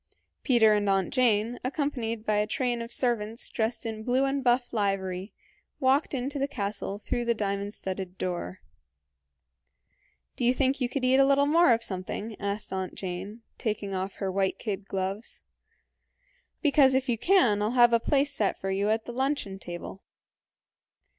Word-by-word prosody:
Peter 230 Hz, -5 st, +5 dB
and 205 Hz, -1 st, +1 dB
Aunt 195 Hz, +2 st, +1 dB
Jane, 235 Hz, -2 st, +2 dB
accompanied 250 Hz, -5 st, -2 dB
by 210 Hz, -1 st, +2 dB
a 210 Hz, 0 st, +1 dB
train 245 Hz, -2 st, -1 dB
of 230 Hz, +1 st, -7 dB
servants 230 Hz, -2 st, -1 dB
dressed 225 Hz, 0 st, -2 dB
in 220 Hz, -1 st, -4 dB
blue 255 Hz, +4 st, +2 dB
and 275 Hz, 0 st, -1 dB
buff 245 Hz, 0 st, +2 dB
livery, 195 Hz, -2 st, -1 dB, 0.5 s
walked 275 Hz, +2 st, +2 dB
into 270 Hz, +3 st, -3 dB
the 275 Hz, -, +1 dB
castle 200 Hz, -5 st, -4 dB
through 240 Hz, +3 st, -2 dB
the 235 Hz, 0 st, +1 dB
diamond 200 Hz, 0 st, -2 dB
studded 190 Hz, -1 st, -5 dB
door. 175 Hz, -, -4 dB, 1.7 s
"Do -, -, -4 dB
you 245 Hz, +2 st, +4 dB
think 270 Hz, +1 st, +1 dB
you 245 Hz, -, +1 dB
could 260 Hz, -1 st, -2 dB
eat 255 Hz, +1 st, +4 dB
a -, -, +7 dB
little 280 Hz, +1 st, +4 dB
more 325 Hz, 0 st, +5 dB
of 230 Hz, 0 st, +2 dB
something?" 200 Hz, +3 st, -5 dB
said 200 Hz, -1 st, -3 dB
Aunt 190 Hz, -1 st, -4 dB
Jane, 195 Hz, +5 st, -6 dB, 0.2 s
taking 210 Hz, -3 st, -2 dB
off 190 Hz, +1 st, -3 dB
her 195 Hz, -2 st, -2 dB
white 190 Hz, 0 st, 0 dB
kid 200 Hz, -3 st, -4 dB
gloves; 195 Hz, +3 st, -4 dB, 1.2 s
"because 280 Hz, -3 st, +5 dB
if 265 Hz, 0 st, +1 dB
you 235 Hz, -3 st, 0 dB
can 245 Hz, -, +4 dB
I'll 210 Hz, -, +1 dB
have 240 Hz, -1 st, +6 dB
a 235 Hz, -, +5 dB
place 285 Hz, +3 st, +1 dB
set 210 Hz, -7 st, 0 dB
for 195 Hz, -, -3 dB
you 200 Hz, +2 st, 0 dB
at 220 Hz, +1 st, 0 dB
the 240 Hz, -, -6 dB
luncheon 260 Hz, -7 st, -1 dB
table." 175 Hz, +2 st, -8 dB
225 Hz, 170 wpm, -28 LUFS, 200-255 Hz, 1.7 s, a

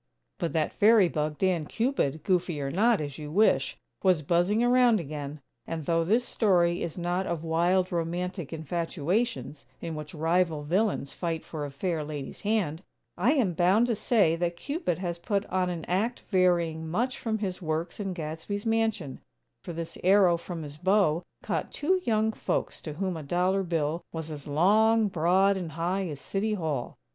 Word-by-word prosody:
But 170 Hz, -4 st, -2 dB
that 160 Hz, -2 st, 0 dB
fairy 210 Hz, -2 st, +5 dB
bug, 150 Hz, -2 st, -2 dB
Dan 180 Hz, -5 st, +1 dB
Cupid, 220 Hz, -, -1 dB
goofy 180 Hz, -4 st, 0 dB
or 135 Hz, -1 st, -2 dB
not, 220 Hz, +6 st, +3 dB
as 145 Hz, -1 st, -5 dB
you 150 Hz, -1 st, -6 dB
wish, 150 Hz, -7 st, +2 dB, 0.2 s
was 180 Hz, -5 st, +3 dB
buzzing 175 Hz, +9 st, +2 dB
around 245 Hz, -2 st, +5 dB
again; 150 Hz, -2 st, -6 dB, 0.3 s
and, 160 Hz, -2 st, -4 dB
though 165 Hz, +1 st, +2 dB
this 225 Hz, +8 st, +2 dB
story 175 Hz, -7 st, +2 dB
is 170 Hz, 0 st, -4 dB
not 175 Hz, +2 st, -1 dB
of 170 Hz, -2 st, -3 dB
wild, 175 Hz, +3 st, +2 dB
romantic 175 Hz, 0 st, -3 dB
infatuations, 170 Hz, -, -2 dB, 0.2 s
in 165 Hz, -, -5 dB
which 155 Hz, 0 st, -7 dB
rival 165 Hz, -1 st, +1 dB
villains 180 Hz, -2 st, 0 dB
fight 165 Hz, -2 st, -3 dB
for 150 Hz, -3 st, -5 dB
a -, -, -8 dB
fair 155 Hz, +3 st, -2 dB
lady's 145 Hz, -2 st, -6 dB
hand, 200 Hz, -7 st, 0 dB, 0.3 s
I 220 Hz, +11 st, +3 dB
am 235 Hz, -, +2 dB
bound 185 Hz, +7 st, +4 dB
to 240 Hz, -2 st, 0 dB
say 200 Hz, -7 st, +3 dB
that 170 Hz, 0 st, -1 dB
Cupid 280 Hz, -, -2 dB
has 175 Hz, -2 st, -4 dB
put 200 Hz, +3 st, -1 dB
on 185 Hz, -1 st, +1 dB
an 170 Hz, -2 st, -4 dB
act 215 Hz, +7 st, -1 dB
varying 170 Hz, -4 st, +2 dB
much 240 Hz, +9 st, -1 dB
from 220 Hz, -2 st, -1 dB
his 195 Hz, -3 st, -4 dB
works 160 Hz, +2 st, -3 dB
in 195 Hz, -2 st, -2 dB
Gadsby's 165 Hz, +5 st, -5 dB
mansion; 220 Hz, -10 st, 0 dB, 0.4 s
for -, -, -6 dB
this 165 Hz, 0 st, -6 dB
arrow 185 Hz, -1 st, +5 dB
from 170 Hz, -1 st, -6 dB
his 145 Hz, 0 st, -9 dB
bow 185 Hz, -3 st, +3 dB, 0.2 s
caught -, -, -2 dB
two 370 Hz, +5 st, +1 dB
young 220 Hz, -1 st, +2 dB
folks -, -, -3 dB
to 155 Hz, -, -6 dB
whom 185 Hz, +3 st, -2 dB
a 160 Hz, -, -5 dB
dollar 180 Hz, +6 st, +1 dB
bill 165 Hz, -2 st, -1 dB
was 160 Hz, -1 st, -5 dB
as 145 Hz, -2 st, -8 dB
long, 210 Hz, +8 st, +4 dB
broad 185 Hz, +3 st, +3 dB
and 170 Hz, -5 st, -5 dB
high 180 Hz, +4 st, -1 dB
as 145 Hz, -4 st, -6 dB
City 210 Hz, +6 st, -1 dB
Hall. 155 Hz, -9 st, -3 dB
175 Hz, 175 wpm, -28 LUFS, 160-200 Hz, 0.4 s, fairy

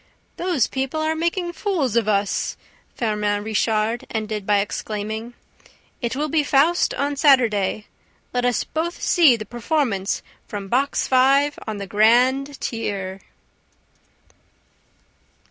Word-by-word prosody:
"Those 350 Hz, -8 st, +1 dB
people 265 Hz, +3 st, -3 dB
are 310 Hz, -, 0 dB
all -, -, -1 dB
making 345 Hz, +2 st, -1 dB
fools 335 Hz, -, -1 dB
of 230 Hz, -3 st, +2 dB
us!" 200 Hz, -1 st, 0 dB, 0.4 s
Firmin 210 Hz, -2 st, -1 dB
Richard 220 Hz, +1 st, 0 dB
ended 215 Hz, -2 st, -4 dB
by 205 Hz, -1 st, +4 dB
exclaiming. 215 Hz, +3 st, -4 dB, 0.7 s
"It 235 Hz, 0 st, -2 dB
will 300 Hz, +3 st, -1 dB
be 305 Hz, 0 st, +1 dB
FAUST 295 Hz, +5 st, +2 dB
on 285 Hz, +1 st, -1 dB
Saturday: 225 Hz, -8 st, +3 dB, 0.5 s
let 245 Hz, 0 st, 0 dB
us 245 Hz, -2 st, +1 dB
both 335 Hz, +2 st, -3 dB
see 320 Hz, -9 st, +5 dB
the 215 Hz, -2 st, -6 dB
performance 240 Hz, -4 st, -1 dB, 0.2 s
from 200 Hz, -2 st, -6 dB
Box 270 Hz, +5 st, +1 dB
Five 275 Hz, +3 st, +3 dB
on 215 Hz, -1 st, -3 dB
the 200 Hz, -, -5 dB
grand 250 Hz, +7 st, +3 dB
tier!" 195 Hz, -4 st, -4 dB
240 Hz, 125 wpm, -22 LUFS, 210-285 Hz, 0.7 s, see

